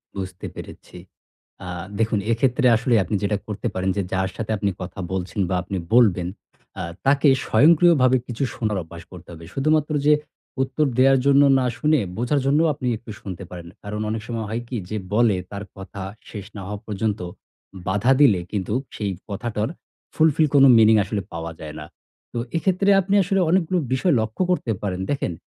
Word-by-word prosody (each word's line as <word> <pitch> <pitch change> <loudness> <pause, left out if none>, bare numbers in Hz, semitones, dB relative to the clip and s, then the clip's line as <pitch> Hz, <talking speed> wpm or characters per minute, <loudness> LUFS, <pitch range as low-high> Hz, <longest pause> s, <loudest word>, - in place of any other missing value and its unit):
বুঝতে 95 -1 -6
পেরেছি। - - -11 0.7
আ - - -7 0.3
দেখুন 110 -1 +1
এক্ষেত্রে 125 +3 +2
আসলে 120 +1 +1
আপনি 95 +4 -3
যেটা 100 0 +1
করতে 105 +2 -3
পারেন 95 +1 -1
যে, - - +2
যার 95 0 0
সাথে 110 -1 -4
আপনি 100 0 0
কথা 90 +2 -7
বলছেন 95 +2 -3
বা 90 - 0
আপনি 95 +1 -4 0.2
বলবেন, 95 -8 +4 0.5
আ - - -2 0.2
তাকে 140 +2 +4 0.2
স্বয়ংক্রিয়ভাবে 155 -4 +5
কিছু 125 +3 -3
শোনার 105 -3 -1
অভ্যাস 85 +1 -11
করতে 90 -1 -12
হবে। 80 0 -11
শুধুমাত্র 150 +2 +1
যে 150 - +7 0.5
উত্তর 135 +3 0
দেওয়ার 135 0 +5
জন্য 140 0 +6 0.2
না 130 - 0
শুনে, 150 +3 +2 0.2
বোঝার 125 +5 +1
জন্যও 150 +4 +3
আপনি 130 -2 -5
একটু 115 0 -11
শুনতে 95 -1 -7
পারেন। 85 -2 -9 0.2
কারণ 105 +1 -4
অনেক 110 0 -2
সময় 115 -2 -3
হয় 115 +2 -2
কি, 125 - -5
যে 110 - -2 0.2
বলে 110 -2 +4 0.2
তার 100 0 -5
কথা 95 +1 -8 0.3
শেষ 105 -3 -7
না 100 - -6
হওয়া 105 0 -5
পর্যন্ত 105 0 -2 0.7
বাধা 105 +7 +2
দিলে 105 -11 +6
কিন্তু 100 -1 -2 0.2
সেই 100 -3 -2 0.2
কথাটার 105 +1 -2 0.5
fulfill 155 0 +3
কোনো 135 0 +8
meaning 110 0 +6
আসলে 100 +1 -3
পাওয়া 85 0 -5
যায় 75 -1 -8
না। 75 - -7 0.5
তো - - -4 0.2
এক্ষেত্রে 190 +3 +1
আপনি 195 +2 -2
আসলে 195 +2 0
অনেকগুলো 185 0 +2 0.2
বিষয় 155 +6 +2
লক্ষ্য 110 +11 -2
করতে 130 -10 0
পারেন। 95 -3 -3
দেখেন, 135 -11 -1
110 Hz, 175 wpm, -22 LUFS, 100-140 Hz, 0.7 s, কোনো